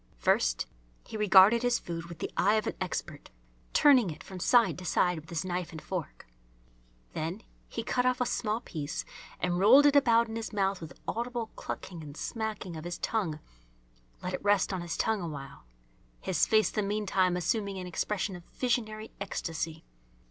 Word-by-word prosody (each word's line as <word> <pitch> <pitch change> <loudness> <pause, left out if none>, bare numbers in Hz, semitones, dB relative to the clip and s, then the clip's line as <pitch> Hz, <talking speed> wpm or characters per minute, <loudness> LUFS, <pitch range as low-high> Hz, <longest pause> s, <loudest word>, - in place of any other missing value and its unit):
First - - +2 0.4
he - - -9
regarded 210 +2 +7
his 245 -1 +2
food 165 -1 -6
with 170 -1 -9
the - - -4
eye 205 +4 +3
of 215 - +1
an - - -1
expert, 165 -4 -4 0.4
turning 260 -9 +5
it 155 - -8
from 190 -1 -9
side 235 +1 +4
to - - -8
side 180 0 +2
with 155 - -15
his 170 +2 -3
knife 180 -1 -3
and 160 - -7
fork. 180 -1 -5 0.9
Then 170 +8 -4 0.3
he 230 - -4
cut 250 +2 +1
off 255 0 +2
a 250 - +2
small 220 -1 -1
piece 150 - -5 0.3
and 180 -1 0
rolled 250 +9 +7
it 290 0 +5
about 235 -4 +5
in 225 0 -5
his 225 - -5
mouth 195 -3 0
with 160 -3 -9
audible 235 -1 -3
clucking 175 -3 -6
and 145 -1 -10
smacking 215 -6 -4
of 155 - -7
his 175 0 -4
tongue, 190 -9 -1 0.9
let - - -3
it - - -4
rest 205 -1 +3
on 185 - -2
his 170 -1 -4
tongue 220 -3 +1
awhile, 140 - -7 0.5
his 180 -4 +1
face 215 -1 +4
the 215 - 0
meantime 195 -3 +1
assuming 200 +3 -1
an 185 - -5
expression 190 +2 -2
of 175 - -10
visionary 220 -3 -2
ecstasy. 165 -4 -4
190 Hz, 180 wpm, -30 LUFS, 170-225 Hz, 0.9 s, regarded